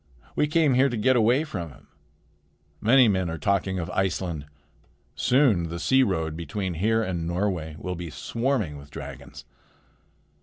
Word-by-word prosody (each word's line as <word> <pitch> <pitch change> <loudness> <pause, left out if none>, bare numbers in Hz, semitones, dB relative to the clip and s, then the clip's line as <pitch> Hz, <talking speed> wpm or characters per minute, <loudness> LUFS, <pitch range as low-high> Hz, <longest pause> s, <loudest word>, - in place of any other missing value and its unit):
We 150 - +2
came 150 -2 +3
here 130 +2 +4
to 120 - -3
get 130 +5 +3
away 120 +5 +3
from 90 - -5
him. 70 - -18 0.9
Many 125 +2 +6
men 95 -4 +1
are 80 - -4
talking 95 +3 0
of 85 -1 -4
Iceland. 90 -5 -2 0.7
Soon 120 - +2
the 85 - -5
sea 130 +10 +3
road 80 -9 0
between 95 +3 -4
here 110 +7 +1
and 85 -4 -3
Norway 85 -3 -2
will 90 - -4
be 85 -1 -6
swarming 115 - -2
with 70 +1 -14
dragons." - - -9
95 Hz, 155 wpm, -25 LUFS, 85-120 Hz, 0.9 s, Many